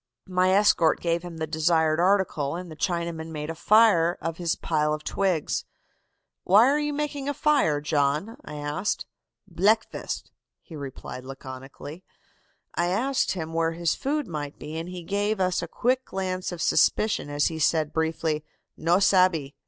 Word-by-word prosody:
"My 185 0 +2
escort 190 -5 +4
gave 170 0 0
him 175 -2 -8
the 160 - -2
desired 160 0 +2
article, 175 -6 +1
and 180 -1 -7
the - - -8
Chinaman 170 -1 -2
made 155 0 -4
a - - -4
fire 180 -2 +4
of 165 -1 -4
his 170 -2 0
pile 150 -1 0
of 155 - -10
twigs. 185 -6 0 0.8
'Why 205 +5 +6
are 285 +2 +3
you 295 0 -1
making 285 -1 -3
a 285 - -2
fire, 275 - +2
John?' 150 +7 0
I - - -8
asked. 150 +7 -2 0.4
"'Bleakfast,' 215 +5 0 0.3
he 165 - -13
replied 135 -3 -7
laconically. 135 +5 -9 0.7
"I 175 - 0
asked 250 +9 +1
him 165 -3 -5
where 165 0 +1
his 170 -1 0
food 290 +1 -2
might 150 -4 -5
be, 150 +2 -8
and 165 +2 -4
he 180 -1 -7
gave 205 +3 -1
us 185 -1 +1
a - - -4
quick 255 +2 0
glance 185 -1 -3
of 175 -1 -4
suspicion 215 -8 +2
as 145 0 +1
he 160 -1 -6
said 155 0 +1
briefly, 160 -1 -1 0.3
'No 170 +3 +2
sabbe. 185 -7 +3
170 Hz, 165 wpm, -26 LUFS, 155-195 Hz, 0.8 s, Why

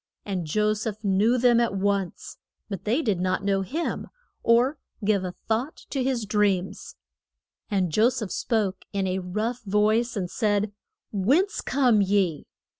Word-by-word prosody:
And 185 -5 -3
Jo 210 +6 +2
seph 215 0 -4
knew 205 +5 +3
them 240 -1 +4
at 235 -4 +1
once, 195 -2 -2 0.3
but 195 -3 -6
they 245 +9 +1
did 205 -7 0
not 185 +1 0
know 195 -1 +1
him, 300 - -3 0.3
or 245 +5 +3 0.3
give 200 -2 +2
a 180 -1 -4
thought 235 +7 -2
to 270 -2 0
his 250 -4 0
dreams. 200 -3 0 0.7
And 190 -5 +1
Jo 220 +9 +4
seph 235 -6 -4
spoke 205 -5 -1
in 195 -1 0
a 185 0 -1
rough 215 +7 -3
voice, 215 +3 +1
and 185 -3 -1
said, 205 +1 0 0.4
Whence 285 - +2
come 250 -6 +3
ye? 190 -5 +1
210 Hz, 155 wpm, -26 LUFS, 195-235 Hz, 0.7 s, them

